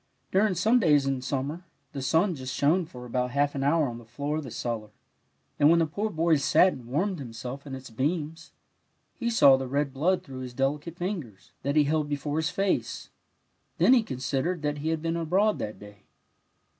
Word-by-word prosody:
During 195 0 +3
some 220 +8 +3
days 150 - +4
in 135 -1 0
smnmer 140 +5 -3 0.3
the 140 - -4
sim 165 +8 +2
just 130 -3 -6
shone 160 +6 +2
for 125 -5 -10
about 125 +1 -1
half 140 +3 +1
an 135 - -3
hour 150 +1 +3
on 120 -1 -6
the - - -13
floor 140 +6 -3
of 155 - -3
the 130 - -7
cellar, 115 -2 -4 0.7
and 145 - +6
when 170 - +5
the 165 - +3
poor 200 +8 -2
boy 165 -3 +2
sat 180 +6 +4
and 120 -2 -11
warmed 175 +8 -1
himself 125 +2 -7
in 135 - -5
its 130 -2 -10
beams, 155 +6 -2 0.6
and - - -41
he - - +3
saw 140 - +6
the 135 0 -4
red 140 +1 -1
blood 175 +7 +1
through 130 -1 -9
his 125 -1 -7
delicate 145 +5 -1
fingers, 170 - -5
that 140 +2 -1
he 150 - +6
held 150 0 0
before 145 +1 -2
his 160 +1 +1
face, 195 +2 -2 0.7
then 255 - +5
he 250 - +6
considered 140 - -2
that 150 0 -1
he 155 +2 -2
had 160 -1 -2
been 165 0 -1
abroad 185 +6 +1
that 105 - -4
day. 105 0 -13
145 Hz, 205 wpm, -27 LUFS, 130-170 Hz, 0.7 s, and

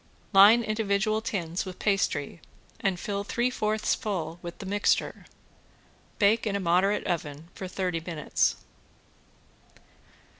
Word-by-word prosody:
Line 205 +5 +8
individual 215 0 0
tins 180 -6 -3
with 185 -2 -8
pastry 175 -6 -1 0.4
and 190 -3 -1
fill 200 +1 -3
three 240 +4 -1
fourths 215 -3 0
full 175 -5 -3
with 170 -1 -8
the - - -8
mixture. 205 +2 0 0.9
Bake 220 +2 +3
in 200 - -1
a - - 0
moderate 185 +3 +2
oven 160 -2 -4
for 190 - -6
thirty 180 -2 -2
minutes. 165 -3 0
195 Hz, 120 wpm, -27 LUFS, 175-210 Hz, 0.9 s, Line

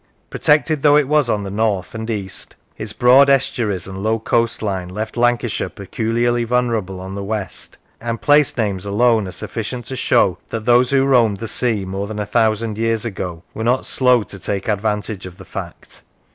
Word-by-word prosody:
Protected 150 0 +2
though 145 0 +6
it 150 -3 +2
was 150 -3 +2
on 105 -2 0
the 100 - -5
north, 105 -3 -1
and 110 0 -5
east, 100 -4 -4 0.2
its 110 -1 -5
broad 130 +5 +5
estuaries 115 -8 +1
and 95 0 -7
low 110 +2 +1
coastline 110 -5 -1
left 110 +4 -5
Lancashire 120 -1 +1
peculiarly 120 +3 -1
vulnerable 115 -6 -1
on 95 +1 -7
the 100 0 -5
west, 105 -1 -3 0.2
and 115 -1 -3
place 145 -2 +3
names 100 -5 -1
alone 110 +1 +2
are - - -6
sufficient 115 +5 -5
to 130 - -5
show 90 -7 +2
that 110 -1 -4
those 120 +1 +4
who 135 -1 +3
roamed 120 -7 +3
the 115 - -5
sea 110 -3 0
more 95 +2 -4
than 110 0 -6
a 105 - -2
thousand 110 0 0
years 115 0 0
ago 90 -6 -5
were 110 - -4
not 125 +3 +1
slow 125 -3 +3
to 100 - -10
take 100 +1 -3
advantage 105 -2 -2
of 90 0 -12
the 95 - -12
fact. 90 -4 -9
110 Hz, 185 wpm, -19 LUFS, 100-120 Hz, 0.2 s, though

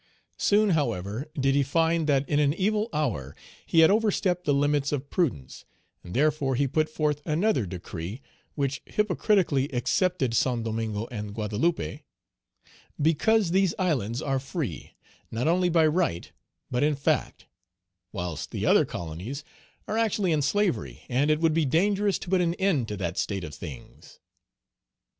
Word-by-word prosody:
Soon, 210 0 +3
however, 115 - -1
did 135 0 +2
he 140 - +3
find 165 +3 +1
that 140 -1 +2
in 145 - +1
an 145 0 +2
evil 210 +4 0
hour 100 - -2 0.3
he 165 - +5
had 160 - +7
overstepped 200 -4 +1
the 145 - +2
limits 145 0 +1
of 140 -1 -3
prudence; 90 - -2 0.4
and 90 - -9
therefore 145 -1 +2
he 140 +3 +2
put 155 +3 0
forth 150 -2 -1
another 160 - +1
decree 90 +3 -6 0.4
which 140 -2 -1
hypocritically 190 -8 +1
excepted 140 +1 0
Saint 120 0 +1
Domingo 110 -1 -2
and 105 -3 -6
Guadeloupe, 105 - -1 1.0
"because 165 +6 +2
these 190 -1 +2
islands 130 - -1
are 135 -2 0
free, 135 - -5 0.3
not 115 +5 -2
only 180 +2 +3
by 165 -2 +4
right, 155 - 0 0.4
but 125 - 0
in 150 0 +2
fact, 140 - -1 0.7
whilst 90 -6 -4
the - - -3
other - - +5
colonies 90 - -6 0.4
are 220 - -1
actually 210 -5 +1
in 155 -2 +2
slavery, 140 - -1
and 135 +5 +2
it 155 0 +3
would 165 -1 +3
be 165 0 +2
dangerous 195 +7 +2
to - - -9
put 185 -1 +3
an 170 -1 +1
end 180 - +1
to 105 - -5
that 85 -2 -3
state 100 -3 -2
of 75 - -7
things." 70 -1 -11
145 Hz, 155 wpm, -27 LUFS, 115-175 Hz, 1.0 s, had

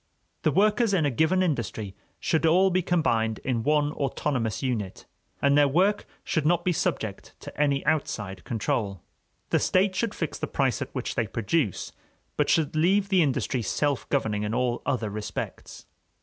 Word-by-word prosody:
The - - +2
workers 210 +1 +3
in 165 -5 +2
a 145 - +1
given 160 +8 +2
industry 115 - -2 0.2
should 165 -2 0
all 185 +4 +4
be 185 +1 +2
combined 115 -11 +1
in 125 -3 0
one 150 +3 +2
autonomous 130 -6 -2
unit, 110 -8 -3 0.4
and 140 0 +4
their 145 0 +5
work 190 +9 +2 0.2
should 155 - 0
not 175 +2 +2
be 180 - +3
subject 110 - -3
to - - -9
any 140 -2 +1
outside 105 - -1
control. 105 -4 -2 0.5
The - - +3
state 190 +1 +2
should 230 +2 -1
fix 165 - -3
the - - -2
price 135 0 0
at 140 - -3
which 130 - -3
they 115 -4 -1
produce, 115 - -1 0.4
but - - +1
should 155 -2 +2
leave 195 +5 +2
the 190 -3 +4
industry 135 -3 0
self 140 +6 -1
governing 110 -7 0
in 105 +1 -2
all 125 -1 0
other 115 -7 -1
respects. 105 0 -6
140 Hz, 170 wpm, -26 LUFS, 115-170 Hz, 0.5 s, their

